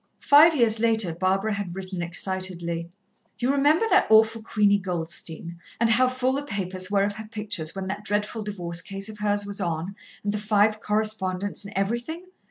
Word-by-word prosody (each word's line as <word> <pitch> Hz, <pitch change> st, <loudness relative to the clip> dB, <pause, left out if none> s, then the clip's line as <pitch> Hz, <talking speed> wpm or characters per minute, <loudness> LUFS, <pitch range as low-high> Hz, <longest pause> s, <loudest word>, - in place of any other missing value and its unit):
Five 310 Hz, +3 st, +6 dB
years 230 Hz, -4 st, +3 dB
later 220 Hz, -6 st, +2 dB
Barbara 190 Hz, +5 st, 0 dB
had 200 Hz, -4 st, -4 dB
written 185 Hz, -2 st, -5 dB
excitedly: 170 Hz, -1 st, -3 dB, 0.5 s
"You 250 Hz, +2 st, +1 dB
remember 290 Hz, +8 st, +3 dB
that -, -, +5 dB
awful 220 Hz, +1 st, +5 dB
Queenie 205 Hz, -2 st, +2 dB
Goldstein? 170 Hz, -2 st, -4 dB, 0.2 s
and 230 Hz, 0 st, +3 dB
how 255 Hz, +3 st, +4 dB
full 255 Hz, 0 st, 0 dB
the 280 Hz, -, -1 dB
papers 190 Hz, -6 st, -3 dB
were 200 Hz, -1 st, +2 dB
of 205 Hz, 0 st, 0 dB
her 220 Hz, 0 st, -7 dB
pictures, 210 Hz, -7 st, -4 dB
when 195 Hz, -1 st, -4 dB
that 200 Hz, +2 st, -4 dB
dreadful 210 Hz, +1 st, -1 dB
divorce 175 Hz, -5 st, -3 dB
case 195 Hz, +3 st, -6 dB
of 215 Hz, -1 st, -10 dB
hers 205 Hz, -1 st, 0 dB
was 200 Hz, 0 st, -6 dB
on, 170 Hz, +2 st, -3 dB, 0.3 s
and 205 Hz, 0 st, -1 dB
the 210 Hz, -, -2 dB
five 210 Hz, 0 st, +2 dB
co 210 Hz, -, -2 dB
respondents 205 Hz, -2 st, -1 dB
and 200 Hz, -, -9 dB
everything? 240 Hz, -, -2 dB
205 Hz, 180 wpm, -25 LUFS, 185-220 Hz, 0.5 s, Five